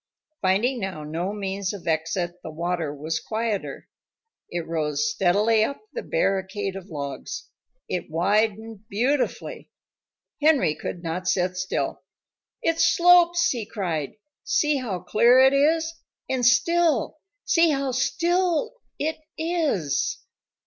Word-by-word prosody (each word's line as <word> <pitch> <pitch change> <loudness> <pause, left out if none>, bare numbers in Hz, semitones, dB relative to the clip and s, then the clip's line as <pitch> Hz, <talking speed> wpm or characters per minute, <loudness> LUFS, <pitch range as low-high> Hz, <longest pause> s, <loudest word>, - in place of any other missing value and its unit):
Finding 210 +7 +2
now 190 -7 -4
no 165 +5 -3
means 195 -1 -3
of 200 -4 -9
exit, 175 +2 -1
the - - -7
water 170 -1 -2
was 155 +3 -3
quieter. 220 -1 -3 0.6
It 175 -1 -3
rose 150 -2 -1
steadily 210 +6 +3
up 280 +5 -2
the 480 - -3
barricade 195 - -1
of 195 0 -8
logs. 140 -3 -6 0.4
It 180 - -3
widened 215 +5 0
beautifully. 255 +7 -1 0.7
Henry 290 - +4
could 170 +3 -6
not 175 +2 -3
sit 180 -1 +1
still. 185 0 -2 0.6
"It 330 0 +1
slopes!" 350 0 +5
he 240 -4 -2
cried. 175 -9 -3 0.3
"See 285 +2 +2
how 210 -9 -3
clear 235 +7 +4
it 265 +1 +6
is! 320 +3 +2 0.3
And 260 -1 -1
still! 310 +2 +3 0.3
See 335 -1 +4
how 275 -2 0
still 345 - 0 0.2
it 315 +2 -2 0.2
is!" 315 - 0
210 Hz, 120 wpm, -24 LUFS, 175-280 Hz, 0.7 s, it